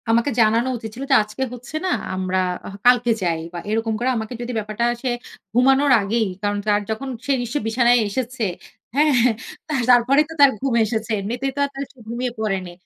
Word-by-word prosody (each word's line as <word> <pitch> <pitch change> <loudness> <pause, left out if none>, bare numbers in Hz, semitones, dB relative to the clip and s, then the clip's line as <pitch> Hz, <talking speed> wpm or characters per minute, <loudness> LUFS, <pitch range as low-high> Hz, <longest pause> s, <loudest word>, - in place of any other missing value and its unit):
আমাকে 235 +4 +3
জানানো 225 +3 +3
উচিত 220 -1 -7
ছিল 265 - -6
যে, - - +7
"আজকে 215 +5 -5
হচ্ছে 250 +4 -9
না, - - +1 0.3
আমরা 185 0 -1 0.3
হ - - -9
কালকে 245 -1 +5
যাই।" 165 -2 0
বা 175 - -4
এরকম 225 +1 0
করে 250 +2 0
আমাকে 220 +2 -4
যদি 240 +1 -4
ব্যাপারটা 215 +2 -2 0.2
সে 260 - -1 0.4
ঘুমানোর 270 +3 +4
আগেই, 220 +2 0
কারণ 205 0 0
তার 205 0 +3
যখন 265 +5 -4 0.2
সে 280 - 0
নিশ্চয়ই 240 +1 -3
বিছানায় 240 +1 +4
এসেছে, 245 +3 -3 0.5
হ্যাঁ? 300 +1 +4 0.5
তা 310 - -4 0.2
তারপরেই 255 +5 +5
তো - - -7
তার 280 -1 +8
ঘুম 270 -2 -1
এসেছে। 220 +1 -3
এমনিতে 235 +7 -4
তো - - -4
আর - - -5
তার 275 - -3
সে - - -33
ঘুমিয়ে 240 +2 -3
পড়েনি। 195 -4 -2
235 Hz, 195 wpm, -21 LUFS, 215-260 Hz, 0.5 s, তার